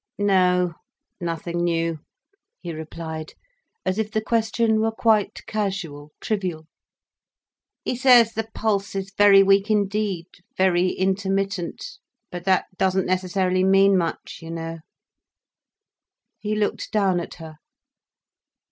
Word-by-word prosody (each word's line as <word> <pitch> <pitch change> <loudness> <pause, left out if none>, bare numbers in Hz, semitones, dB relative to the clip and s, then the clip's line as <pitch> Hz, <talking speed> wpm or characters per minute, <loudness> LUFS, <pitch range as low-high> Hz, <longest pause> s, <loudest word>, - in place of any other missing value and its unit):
"No—nothing 180 -2 -1
new," 165 -2 0 0.6
he 170 - -6
replied, 160 0 -7 0.5
as 185 +3 0
if 215 -1 -1
the 220 - 0
question 220 0 +1
were 220 +1 +2
quite 220 -2 +1
casual, 190 -9 -4
trivial. 185 -7 -3 1.2
"He - - -1
says 245 -3 +6
the 225 0 -4
pulse 200 -3 -1
is 195 0 -4
very 200 -1 +7
weak 195 +2 +3
indeed, 205 -4 0 0.3
very 185 -1 +3
intermittent—but 195 - -3
that 190 -1 +3
doesn't 190 0 +2
necessarily 185 0 0
mean 195 +1 +5
much, 170 -3 -2
you 165 - -9
know." 165 0 -5 1.6
He 215 0 -2
looked 210 -1 -2
down 195 -4 +2
at 170 - -7
her. 160 -2 -11
190 Hz, 110 wpm, -23 LUFS, 175-210 Hz, 1.6 s, very